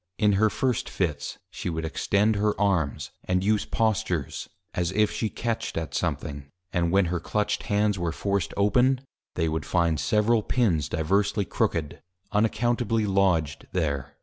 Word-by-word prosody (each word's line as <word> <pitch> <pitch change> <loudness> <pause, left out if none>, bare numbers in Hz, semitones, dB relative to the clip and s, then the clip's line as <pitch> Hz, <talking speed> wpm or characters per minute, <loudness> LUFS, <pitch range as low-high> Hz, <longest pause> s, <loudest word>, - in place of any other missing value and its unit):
In 105 -1 +4
her 105 +2 +3
first 125 +1 -1
Fits, 80 -6 -2
she - - -4
would 80 -1 -3
Extend 105 +6 +1
her 105 0 0
Arms, 95 -8 0
and 90 0 +1
use 105 +1 +2
Postures, 110 - -1 0.2
as 90 0 -1
if 105 0 +3
she 110 - -1
catched 115 -5 -3
at 80 -3 -3
something, 70 -1 -3 0.2
and 85 -2 +1
when 100 0 +4
her 85 +1 -1
Clutched 105 +5 -1
Hands 105 -1 +2
were 85 -1 -1
forced 100 +2 -1
open, 125 +6 +3 0.3
they 80 - +1
would 80 -1 -1
find 85 -3 +1
several 105 +9 +2
Pins 90 - +1
diversely 100 +6 +1
Crooked, 80 -3 -1 0.3
unaccountably 115 +1 +1
lodged 90 -7 +1
there. 70 -7 -2
100 Hz, 150 wpm, -26 LUFS, 80-105 Hz, 0.3 s, In